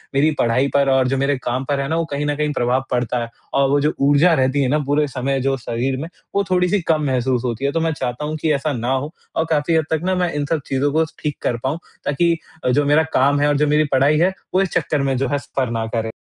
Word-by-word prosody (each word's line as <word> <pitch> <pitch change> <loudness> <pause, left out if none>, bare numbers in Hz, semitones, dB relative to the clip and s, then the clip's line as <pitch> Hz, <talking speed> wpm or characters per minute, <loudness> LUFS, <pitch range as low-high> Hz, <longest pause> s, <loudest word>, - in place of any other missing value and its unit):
मेरी 150 +3 +4
पढ़ाई 120 +4 +2
पर 140 -1 +3
और 130 -1 +3
जो 135 +1 0
मेरे 140 +1 +1
काम 125 +2 -1
पर 140 -1 +1
है 135 - -1
ना, 160 - -1
वो 165 0 0
कहीं 145 +1 -2
न 145 0 0
कहीं 150 0 -1
प्रभाव 125 0 +1
पड़ता 125 0 0
है 115 - -7 0.2
और 135 -1 +3
वो 145 +1 +3
जो 150 +2 +1
ऊर्जा 145 +5 +4
रहती 135 -1 +2
है 135 - +2
ना 150 +3 +2
पूरे 145 +2 +1
समय 135 0 -2
जो 135 +1 +1
शरीर 125 +2 -2
में, 160 - -4 0.3
वो 200 - +3
थोड़ी-सी 180 +2 +2
कम 155 -1 +1
महसूस 130 -2 0
होती 120 +2 -2
है। 140 - +1
तो 165 - 0
मैं 165 0 +1
चाहता 125 0 -4
हूँ 155 +1 -3
कि 160 - +1
ऐसा 145 +1 -1
ना 120 0 -2
हो 140 +4 -3 0.2
और 165 - +1
काफ़ी 160 +1 +1
हद 160 -1 +2
तक 160 -1 +1
ना, 185 +1 +1
मैं 180 -1 0
इन 145 -1 -1
सब 160 -2 0
चीज़ों 135 +2 0
को 160 +1 +3 0.2
ठीक 150 -2 -3
कर 120 - 0
पाऊँ, 135 +4 -1 0.3
ताकि 170 +4 +2 0.3
अ, - - +3
जो 145 +4 +2
मेरा 150 +3 +4
काम 140 +2 +3
है 145 - +3
और 145 -1 +2
जो 150 +1 +2
मेरी 150 +1 +3
पढ़ाई 140 +3 +3
है, 180 +3 +3 0.2
वो 185 - +3
इस 195 - 0
चक्कर 150 -3 0
में 135 -1 0
जो 135 +2 0
है, 145 - 0
सफ़र 135 -2 -3
ना 115 -1 -2
करे। 110 -1 -1
140 Hz, 280 wpm, -20 LUFS, 130-155 Hz, 0.3 s, मेरी